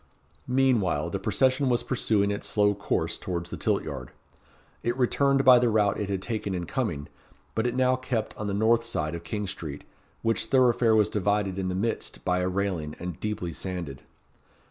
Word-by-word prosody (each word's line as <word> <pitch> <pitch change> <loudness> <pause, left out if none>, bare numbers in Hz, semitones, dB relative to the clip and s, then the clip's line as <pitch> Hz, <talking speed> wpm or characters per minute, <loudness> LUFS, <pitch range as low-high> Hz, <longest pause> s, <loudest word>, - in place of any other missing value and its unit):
Meanwhile, 115 - +2
the 100 - -2
procession 130 +7 +2
was 120 -1 +1
pursuing 110 -5 +1
its 100 - -3
slow 105 -1 +3
course 100 0 -2
towards 85 -1 -4
the - - -3
tilt - - 0
yard. - - -6 0.7
It 120 +1 -1
returned 135 +2 +2
by 125 -1 +9
the 120 -1 +2
route 105 -2 +2
it 105 -1 -2
had 95 -1 -2
taken 105 -4 -2
in 90 -1 -3
coming; 95 - -2 0.5
but 110 +2 0
it 120 - -2
now 130 0 +3
kept 125 -4 -3
on 105 - -4
the 100 - -1
north 115 +2 +3
side 80 -10 -2
of 85 0 -5
King 105 +5 -3
Street, 75 -6 -6 0.4
which 115 0 +1
thoroughfare 120 -3 +4
was 105 -1 +4
divided 100 -2 0
in 95 - -1
the 90 - -2
midst 110 +4 -3
by 90 0 +2
a 90 0 0
railing, 90 -6 -2
and 90 -2 -6
deeply 105 -6 -3
sanded. 85 -8 -5
105 Hz, 190 wpm, -27 LUFS, 90-120 Hz, 0.7 s, by